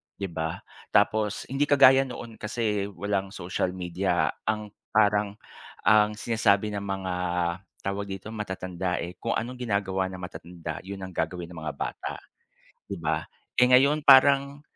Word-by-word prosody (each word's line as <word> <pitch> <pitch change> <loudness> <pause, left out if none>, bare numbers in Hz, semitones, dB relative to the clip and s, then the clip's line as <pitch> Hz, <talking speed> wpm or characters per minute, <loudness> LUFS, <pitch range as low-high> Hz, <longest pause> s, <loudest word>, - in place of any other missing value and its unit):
'di 100 - -4
ba? 80 0 -2 0.4
Tapos 105 0 +2
hindi 140 +2 +1
kagaya 135 -1 +6
noon, 120 -3 -9
kasi 105 -2 -1
walang 100 +1 -2
social 90 +1 -2
media 90 -3 0 0.2
ang 105 -1 -1 0.2
parang 105 -1 +3 0.5
ang 105 0 +5
sinasabi 105 -2 +2
ng 100 - -3
mga 95 -2 -3 0.7
tawag 100 +1 -3
dito 95 0 -7
matatanda 95 -4 -3
eh, 85 +1 -6
kung 115 - -2
anong 125 +3 -3
ginagawa 95 -3 0
ng 95 - -8
matatanda 85 -3 -7
'yon 100 0 -6
ang 95 -2 -8
gagawin 85 +1 -2
ng 85 - -11
mga - - -3
bata, - - -5 0.6
'di - - -6
ba. - - 0 0.3
Eh 125 - +7
ngayon 140 +4 +5
parang 140 +1 +6
100 Hz, 145 wpm, -27 LUFS, 95-110 Hz, 0.7 s, Eh